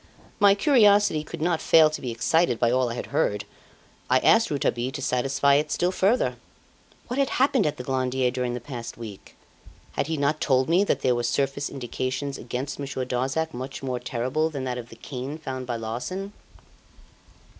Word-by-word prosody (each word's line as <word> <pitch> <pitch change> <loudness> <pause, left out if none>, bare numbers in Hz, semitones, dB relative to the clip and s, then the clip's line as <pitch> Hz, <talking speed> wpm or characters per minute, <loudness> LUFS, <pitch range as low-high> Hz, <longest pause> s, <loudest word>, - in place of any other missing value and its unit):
My 200 -1 +6
curiosity 205 - +4
could 160 0 -6
not 170 -1 +1
fail 155 -2 +6
to 155 - -5
be 125 - -4
excited 125 +3 +1
by 120 0 +2
all 130 -1 +2
I 115 - -4
had - - -4
heard. 105 0 0 0.6
I 130 - +5
asked 225 0 +4
Rouletabille 130 -3 -1
to 140 - -5
satisfy 135 +2 +2
it 150 +1 -1
still 175 +1 +1
further. 200 +6 +1 0.7
What 250 +3 -3
had 275 - +2
happened 260 - +3
at 150 - -2
the 125 - -6
Glandier 130 -1 0
during 125 -1 -2
the - - -4
past 120 -1 -7
week? 110 -4 -10 0.6
Had - - -2
he 160 -1 -2
not 145 +2 0
told 130 0 +2
me 175 +4 +4
that - - 0
there 125 - +3
were 120 - -1
surface 135 +4 -1
indications 130 +1 -4
against 125 +5 -5
Monsieur 135 -2 -3
Darzac 135 +6 -1
much 130 +2 -6
more 130 -2 -2
terrible 130 +6 -1
than 140 -4 -5
that 125 -1 -3
of 120 -1 -9
the - - -12
cane 135 +3 -6
found 130 -5 -6
by 120 - -2
Larsan? 125 - -5
135 Hz, 190 wpm, -25 LUFS, 125-160 Hz, 0.7 s, My